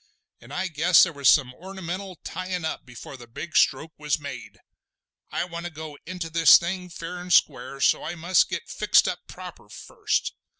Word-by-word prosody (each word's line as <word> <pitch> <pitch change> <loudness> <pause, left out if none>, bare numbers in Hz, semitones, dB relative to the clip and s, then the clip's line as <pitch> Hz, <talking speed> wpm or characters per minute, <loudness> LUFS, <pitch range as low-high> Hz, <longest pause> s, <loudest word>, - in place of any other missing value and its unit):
And - - -15
I 190 - -2
guess 170 +2 +5
there 170 - 0
was 140 -2 +3
some 130 -4 +4
ornamental 190 +3 -7
tyin' 185 -2 -4
up 160 - -5
before 125 +2 -10
the 120 -1 -13
big 155 +8 -8
stroke 160 +1 +2
was 150 -1 0
made. 140 -4 -9 0.7
I - - -1
want 170 -1 -6
to - - -9
go 155 -1 -9
into 175 -2 -5
this 165 0 +8
thing 180 +1 -4
fair 170 +1 -7
and 180 0 -8
square, 140 -3 +2
so - - +2
I 175 - -5
must 175 +2 +2
get - - -5
fixed - - +3
up - - -2
proper - - -11
first. 425 -3 -3
170 Hz, 185 wpm, -25 LUFS, 150-180 Hz, 0.7 s, this